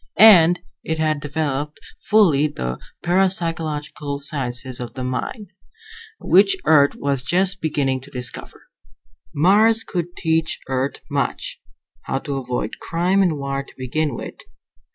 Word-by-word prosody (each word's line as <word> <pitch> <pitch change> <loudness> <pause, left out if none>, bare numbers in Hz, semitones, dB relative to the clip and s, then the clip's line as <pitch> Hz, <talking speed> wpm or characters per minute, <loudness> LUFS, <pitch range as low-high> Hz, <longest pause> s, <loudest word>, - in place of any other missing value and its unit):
And 180 -5 +7 0.2
it 160 - -2
had 155 -1 0
developed 150 0 -3 0.2
fully 165 -9 +4
the 65 - -4 0.2
parapsychological 165 -5 -1
sciences 130 -3 -3
of 120 -1 -7
the 130 - -4
mind, 180 - -4 0.7
which 385 0 +4
Earth 145 -2 +5
was 140 -2 -1
just 185 +7 0
beginning 140 -4 0
to 140 - -14
discover. 125 -4 -6 0.7
Mars 215 +8 +4
could 175 -3 -4
teach 160 0 0
Earth 130 +1 -2
much. - - -2 0.4
How - - -1
to 140 -1 -4
avoid 125 -4 -4
crime 180 +4 +1
and 175 -6 +2
war 140 0 -2
to 140 - -15
begin 135 +2 -2
with. - - -7
150 Hz, 130 wpm, -21 LUFS, 135-175 Hz, 0.7 s, And